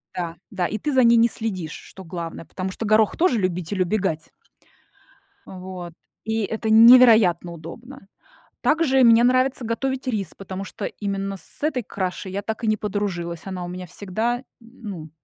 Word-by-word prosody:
Да 170 -2 -4
да, 180 - -2
и 215 - -3
ты 290 +7 -2
за 260 -1 +5
ней 235 0 +6
не 230 +1 +5
следишь, 190 -9 -5
что 190 - -12
главное, 165 -1 -6
потому 190 +3 -5
что 225 - -5
горох 215 0 +3
тоже 340 -8 +3
любитель 185 -1 -2
убегать 180 -4 -1 1.2
Вот, 185 -2 -8 0.3
и 220 0 -1
это 220 +1 -3
невероятно 220 -7 +7
удобно. 195 - -11 0.5
Также 295 -4 +3
мне 230 0 +6
нравится 255 +1 +2
готовить 265 +3 -2
рис, 205 -8 -2
потому 195 0 -7
что - - -6
именно 195 -1 -4
с 190 - -14
этой 295 -5 0
кашей 190 -1 -4
я 200 +2 -3
так 220 +3 -5
и - - 0
не 215 - +3
подружилась. 185 -5 -3
Она 185 -2 -5
у - - -5
меня 180 +1 -7
всегда, 220 +7 -3 0.2
ну, 215 -9 -9
205 Hz, 165 wpm, -23 LUFS, 180-235 Hz, 1.2 s, невероятно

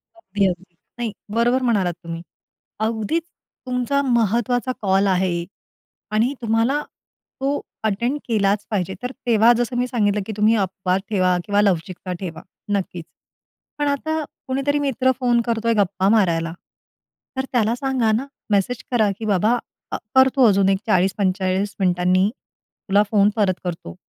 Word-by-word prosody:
अगदी, 205 - -1
अगदी. 180 0 -5 0.3
नाही, 230 -3 -1 0.2
बरोबर 240 +3 +3
म्हणालात 200 -8 +1
तुम्ही. 165 0 -6 0.6
अगदीच, 220 +9 0 0.4
तुमचा 250 +2 0
महत्त्वाचा 240 0 +1
कॉल 195 0 +3
आहे 180 -2 +1 0.7
आणि 225 +5 +2
तुम्हाला 230 +6 +1 0.6
तो 275 +2 0 0.2
अटेंड 235 +7 0
केलाच 205 -2 +1
पाहिजे, 190 -3 -1
तर 250 - -3 0.2
तेव्हा 230 0 +6
जसं 245 +1 -1
मी 245 +1 +1
सांगितलं, 210 -4 +1
की 220 - -4
तुम्ही 215 +2 +4
अपवाद 190 -1 0
ठेवा 185 -3 +2
किंवा 205 0 +2
लवचिकता 185 -1 -1
ठेवा. 165 -4 -6 0.3
नक्कीच. 180 -4 -2 0.7
पण 290 - 0
आता 315 +3 -1 0.3
कुणीतरी 275 +2 0
मित्र 260 -2 +1
फोन 240 -1 +3
करतोय 230 0 +1
गप्पा 190 -1 +2
मारायला, 170 -7 +2 0.8
तर 265 - -1
त्याला 230 -2 +2
सांगा 255 -4 0
ना, 240 +6 0 0.2
मेसेज 210 +4 +1
करा 220 -5 +3
की 225 - -5
"बाबा, 210 +3 +2 0.4
अ, - - +1 0.2
करतो 265 0 +5
अजून 195 -1 +3
एक 195 0 +3
40-45 190 0 +1
मिनिटांनी, 180 +1 +3 0.6
तुला 200 +1 +5
फोन 205 -2 +4
परत 200 -3 +2
करतो" 165 - -5
210 Hz, 140 wpm, -21 LUFS, 190-245 Hz, 0.8 s, तेव्हा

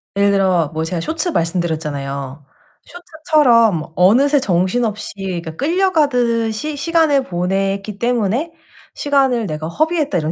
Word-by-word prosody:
예를 200 0 +3
들어 185 -5 +2
뭐 160 - -2
제가 165 0 -3
쇼츠 320 - +1
말씀드렸잖아요. 150 - -3 0.4
쇼츠처럼 265 - +1
어느새 265 +11 +4
정신없이 210 +3 -1
이렇게 175 -4 -5
끌려가듯이 285 - 0
시간을 310 -2 +2
보냈기 195 +3 -2
때문에 245 - -1 0.4
'시간을 270 -5 +1
내가 155 0 -5
허비했다.' 305 - 0
이런 155 0 -2
215 Hz, 320 characters per minute, -18 LUFS, 175-285 Hz, 0.4 s, 어느새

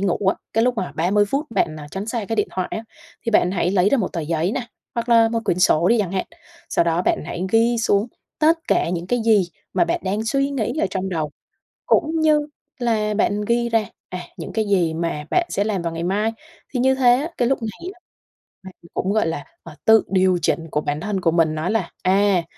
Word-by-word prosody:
ngủ 195 -3 +1
á, 195 - +3 0.2
cái 225 +1 +2
lúc 250 0 +1
mà 185 -4 -3
30 195 +6 +2
phút 290 +3 -1
bạn, 155 -8 0
à, 145 - -8
tránh 195 +5 -5
xa 225 -2 -2
cái 225 +2 -3
điện 210 - +1
thoại 185 - -3
á, 220 - -4 0.4
thì 230 - +1
bạn 180 -4 +3
hãy 180 -1 0
lấy 190 0 +3
ra 275 - +2
một 190 - -2
tờ 165 - -2
giấy 165 +4 -1
nà, - - -1 0.3
hoặc 235 0 -3
là 230 -1 +6
một 230 0 -1
quyển 175 - 0
sổ 175 -1 +4
đi 235 0 +4
chẳng 195 -3 -1
hạn, 190 - -1 0.4
sau - - +2
đó 170 +1 +1
bạn - - +1
hãy 170 +2 -4
ghi 230 +1 +4
xuống 210 -1 +2 0.3
tất 320 +2 +4
cả - - +2
những 175 0 -3
cái 245 +2 0
gì 205 -6 +4 0.2
mà - - +3
bạn 170 - -1
đang 205 +4 -1
suy 275 +4 +1
nghĩ 270 -1 -2
ở - - +2
trong 190 0 -2
đầu, 155 -5 -2 0.6
cũng 320 +1 +2
như 300 -1 +3 0.3
là 220 -3 0
bạn 210 0 +1
ghi 235 +1 +1
ra, 225 -2 +2 0.2
à, 180 - -5 0.2
những - - -7
cái 220 -1 0
gì 180 -5 +2
mà 165 -2 -3
bạn 345 -1 +2
sẽ 200 - 0
làm 205 -4 -1
vào 170 -1 -3
ngày 165 - -4
mai. 205 +5 0 0.4
Thì 250 - -1
như 265 +1 +3
thế 245 -2 +5
á, 285 +5 -1
cái 240 - +2
lúc 270 - +1
này 285 - -6
á 360 - -25 0.6
bạn 190 -1 -10 0.2
cũng, 190 - -1
gọi 215 -5 +2
là, 165 - -3 0.2
à, - - -11
tự 220 -1 +6
điều 185 -1 +3
chỉnh 160 +1 0
của 150 - 0
bản 145 +1 -2
thân 195 -1 -2
của 165 - +2
mình 160 -2 +2
nó 155 +4 -2
là: 215 -6 -1
"À, 190 -1 +3
205 Hz, 245 wpm, -21 LUFS, 175-230 Hz, 0.6 s, là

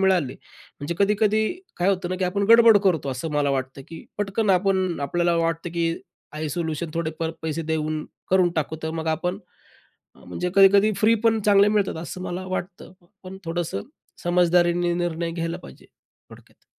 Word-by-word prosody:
मिळाले, 185 -9 +2 0.5
म्हणजे 145 +4 -3
कधी-कधी 210 +1 +2 0.3
काय 180 +2 +1
होतं 185 -3 0
ना, 185 - -1
की 185 - -1
आपण 200 +3 0
गडबड 230 -2 +8
करतो 160 -7 +1
असं 135 +5 -4
मला 145 -1 +1
वाटतं, 135 0 -3
की 165 - -10
पटकन 205 +1 0
आपण 185 -2 +1
आपल्याला 170 +4 0
वाटतं, 165 +1 -1
की 165 0 0 0.4
आहे 155 0 -4
सोल्यूशन 160 +1 -3
थोडेफार 165 0 -2
पैसे 160 +1 -3
देऊन 155 -1 -2 0.3
करून 185 -2 +4
टाकू 155 +1 -1
तर 160 - -2
मग 160 - -6
आपण 180 +4 -3 0.8
अ, - - -20
म्हणजे 180 0 -3
कधी-कधी 200 +2 +6
फ्री 215 +3 +4
पण 225 -1 +3
चांगले 200 0 +6
मिळतात 210 -4 0
असं 180 +2 -7
मला 185 +1 -5
वाटतं. 185 -1 -6 0.3
पण 190 +1 -9
थोडंसं 165 - -3 0.4
समझदारीने 175 0 +2
निर्णय 170 -1 -2
घ्यायला 165 0 -3
पाहिजे 65 - -14 0.4
थोडक्यात. - - -18
175 Hz, 165 wpm, -23 LUFS, 160-190 Hz, 0.8 s, गडबड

